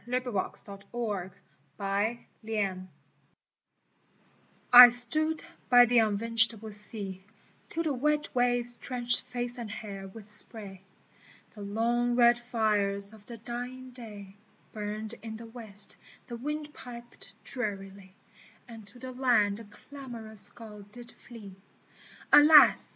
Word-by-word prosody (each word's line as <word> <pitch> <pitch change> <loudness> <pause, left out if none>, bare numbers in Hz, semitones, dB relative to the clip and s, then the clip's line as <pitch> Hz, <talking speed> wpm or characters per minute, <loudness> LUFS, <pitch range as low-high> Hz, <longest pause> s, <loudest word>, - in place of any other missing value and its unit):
VITA 250 0 -4
NUOVA 200 -4 -1 1.4
1 200 +4 -3 2.7
STOOD 310 +7 +1 0.3
by 245 -1 +6
the 240 0 +1
unvintageable 225 0 +4
sea 200 -2 +1 0.5
Till 330 - -5
the 310 -3 -3
wet 300 +3 -3
waves 245 -1 -1
drenched 245 -2 +2
face 245 0 -8
and 230 -3 -8
hair 200 -2 -10
with 210 +1 -11
spray, 205 -3 +3 0.7
The 210 - -14
long 235 +4 -3
red 240 0 +3
fires 210 -4 +3
of 210 -2 -19
the 235 - -11
dying 245 +3 -9
day 210 -6 -13 0.4
Burned 215 +1 -6
in 220 0 -9
the 230 - -13
west; 225 -3 -3 0.3
the 240 - -10
wind 295 +4 -7
piped 240 -1 -11
drearily; 195 -5 -6 0.5
And 225 -3 -14
to 205 - -17
the 255 +1 -10
land 240 -6 0
the 230 - -13
clamorous 225 -1 -6
gulls 210 -3 -14
did 240 +1 -14
flee: 220 -5 -15 0.4
" - - -24
Alas 300 0 +5
230 Hz, 120 wpm, -26 LUFS, 210-245 Hz, 2.7 s, by